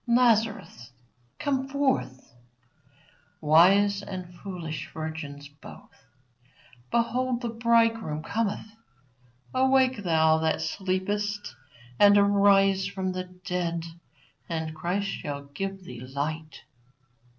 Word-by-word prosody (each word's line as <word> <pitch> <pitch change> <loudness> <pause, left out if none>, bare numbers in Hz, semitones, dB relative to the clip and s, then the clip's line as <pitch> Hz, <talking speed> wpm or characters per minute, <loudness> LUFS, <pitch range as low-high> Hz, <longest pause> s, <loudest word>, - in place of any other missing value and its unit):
Lazarus! 225 - +2 0.5
come 270 -2 -1
forth! 265 - -1 1.1
Wise 195 +6 +5
and 185 -3 -7
foolish 175 -4 -6
virgins 155 -3 -6
both: 145 +1 -15 0.8
Behold 245 +1 0
the 240 - -2
Bridegroom 225 -8 +1
cometh! 220 +2 -2 0.9
Awake, 260 0 +3
thou 160 -2 +3
that 160 0 0
sleepest, 205 -1 -2 0.4
and 205 0 +7
arise 200 -1 +4
from 190 -2 -3
the 185 0 -4
dead, 180 -2 -4 0.6
and 160 -2 -3
Christ 180 +5 -2
shall 145 -7 -5
give 195 +7 -6
thee 125 -9 -9
light! 145 +3 -5
190 Hz, 95 wpm, -27 LUFS, 160-215 Hz, 1.1 s, and